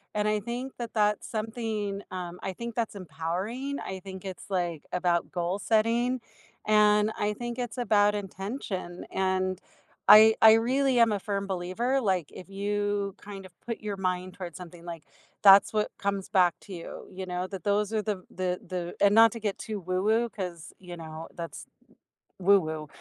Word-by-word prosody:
And 210 Hz, 0 st, +1 dB
I 210 Hz, 0 st, +2 dB
think 245 Hz, +5 st, -5 dB
that 235 Hz, -2 st, -5 dB
that's 210 Hz, -1 st, +1 dB
something, 215 Hz, -3 st, -3 dB
um, 180 Hz, -1 st, -6 dB
I 190 Hz, -, -3 dB
think 235 Hz, +3 st, -6 dB
that's 230 Hz, -3 st, -2 dB
empowering. 190 Hz, -, -4 dB
I 190 Hz, 0 st, -5 dB
think 190 Hz, 0 st, -9 dB
it's, 190 Hz, -1 st, -7 dB
like, 175 Hz, -5 st, -2 dB
about 175 Hz, -1 st, +1 dB
goal 175 Hz, +2 st, -1 dB
setting, 230 Hz, +4 st, +1 dB, 0.4 s
and 210 Hz, 0 st, +4 dB
I 210 Hz, 0 st, +1 dB
think 240 Hz, +2 st, -5 dB
it's 245 Hz, +1 st, -4 dB
about 210 Hz, -3 st, +4 dB
intention. 195 Hz, -2 st, -5 dB
And 185 Hz, -1 st, 0 dB, 0.5 s
I 220 Hz, +1 st, +9 dB
I 220 Hz, 0 st, +10 dB
really 255 Hz, +3 st, +2 dB
am 230 Hz, -2 st, +5 dB
a 205 Hz, -, 0 dB
firm 200 Hz, 0 st, -3 dB
believer, 195 Hz, +9 st, -1 dB
like, 185 Hz, -, 0 dB
if 185 Hz, -, -11 dB
you 205 Hz, 0 st, -1 dB
kind 200 Hz, -2 st, -9 dB
of 185 Hz, -, -14 dB
put 230 Hz, -1 st, -5 dB
your 210 Hz, -2 st, -4 dB
mind 185 Hz, -1 st, -2 dB
towards 175 Hz, -3 st, -7 dB
something, 175 Hz, -1 st, -11 dB
like, 170 Hz, -3 st, -7 dB, 0.4 s
that's 195 Hz, 0 st, +8 dB
what 210 Hz, 0 st, +1 dB
comes 200 Hz, -1 st, -2 dB
back 185 Hz, -4 st, +4 dB
to 200 Hz, -, -10 dB
you, 170 Hz, -, -8 dB
you 190 Hz, 0 st, -6 dB
know, 180 Hz, 0 st, -3 dB
that 195 Hz, -1 st, -7 dB
those 205 Hz, +1 st, +1 dB
are 215 Hz, -, +1 dB
the 205 Hz, -3 st, -3 dB
the 180 Hz, -1 st, -2 dB
the 180 Hz, -1 st, -4 dB
and 200 Hz, 0 st, +6 dB
not 225 Hz, -1 st, +8 dB
to 230 Hz, -, -6 dB
get 205 Hz, -3 st, -2 dB
too 215 Hz, -2 st, -5 dB
woo-woo 200 Hz, +6 st, +1 dB
'cause, 180 Hz, -6 st, -6 dB
you 180 Hz, -2 st, -9 dB
know, 160 Hz, 0 st, -8 dB
that's 170 Hz, -1 st, -7 dB, 0.7 s
woo-woo. 160 Hz, -5 st, +2 dB
200 Hz, 175 wpm, -28 LUFS, 180-220 Hz, 0.7 s, I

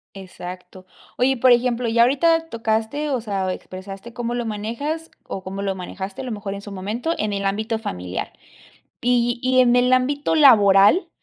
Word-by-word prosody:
Exacto. 185 Hz, -1 st, -10 dB, 0.3 s
Oye, 250 Hz, +2 st, +3 dB
y -, -, -2 dB
por 250 Hz, +1 st, +5 dB
ejemplo, 245 Hz, 0 st, +1 dB
ya 235 Hz, +1 st, +3 dB
ahorita 325 Hz, +6 st, +3 dB
tocaste, 225 Hz, +6 st, -2 dB
o 255 Hz, -3 st, 0 dB
sea, 195 Hz, -4 st, -2 dB
expresaste 195 Hz, +5 st, -9 dB
cómo 240 Hz, 0 st, -3 dB
lo 240 Hz, -1 st, -2 dB
manejas 235 Hz, +10 st, -4 dB, 0.2 s
o 190 Hz, -, -6 dB
cómo 195 Hz, +1 st, -6 dB
lo 195 Hz, -1 st, -1 dB
manejaste, 190 Hz, +3 st, -7 dB
a -, -, -7 dB
lo 245 Hz, -, -4 dB
mejor 205 Hz, -2 st, -5 dB
en 200 Hz, -, -8 dB
su 205 Hz, -, -9 dB
momento, 215 Hz, -, -3 dB
en 210 Hz, -1 st, -1 dB
el 200 Hz, 0 st, -3 dB
ámbito 220 Hz, +3 st, -1 dB
familiar. 90 Hz, -, -5 dB, 0.7 s
Y 240 Hz, 0 st, +1 dB
y 255 Hz, 0 st, +2 dB
en 245 Hz, -1 st, +5 dB
el 250 Hz, +1 st, +3 dB
ámbito 285 Hz, +5 st, +1 dB
laboral, 210 Hz, -, +6 dB
225 Hz, 180 wpm, -22 LUFS, 195-255 Hz, 0.7 s, laboral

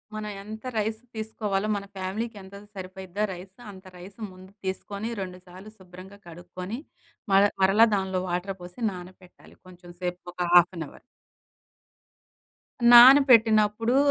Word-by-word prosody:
మనం 215 Hz, -1 st, -5 dB
ఎంత 220 Hz, +1 st, -9 dB
రైస్ 220 Hz, +1 st, -1 dB, 0.2 s
తీసుకోవాలో 215 Hz, -2 st, -3 dB
మన 200 Hz, 0 st, -5 dB
ఫ్యామిలీకి 210 Hz, +5 st, -4 dB
ఎంతైతే 200 Hz, +2 st, -13 dB
సరిపోయిద్దో 190 Hz, +1 st, -6 dB
రైస్ 185 Hz, +1 st, -12 dB, 0.2 s
అంత 190 Hz, -1 st, -15 dB
రైస్ 190 Hz, +4 st, -13 dB
ముందు 185 Hz, +1 st, -15 dB
తీసుకొని, 200 Hz, +3 st, -4 dB
2 180 Hz, -1 st, -7 dB
సార్లు 185 Hz, +4 st, -12 dB
శుభ్రంగా 185 Hz, +2 st, -14 dB
కడుక్కొని, 180 Hz, +6 st, -8 dB, 0.5 s
మర్ 195 Hz, +1 st, +6 dB, 0.2 s
మరలా 210 Hz, +5 st, +5 dB
దాంట్లో 190 Hz, -1 st, -2 dB
వాటర్ 180 Hz, +2 st, -3 dB
పోసి 175 Hz, +6 st, -12 dB
నానపెట్టాలి 180 Hz, 0 st, -14 dB
కొంచెం 175 Hz, -1 st, -14 dB
సేపు 180 Hz, 0 st, -4 dB
ఒక 175 Hz, -1 st, -3 dB
హాఫ్ 175 Hz, +1 st, +6 dB
అన్ 160 Hz, -, -4 dB
హౌర్. -, -, -16 dB, 1.9 s
నానపెట్టినప్పుడు 235 Hz, -3 st, +6 dB
190 Hz, 130 wpm, -26 LUFS, 180-215 Hz, 1.9 s, మర్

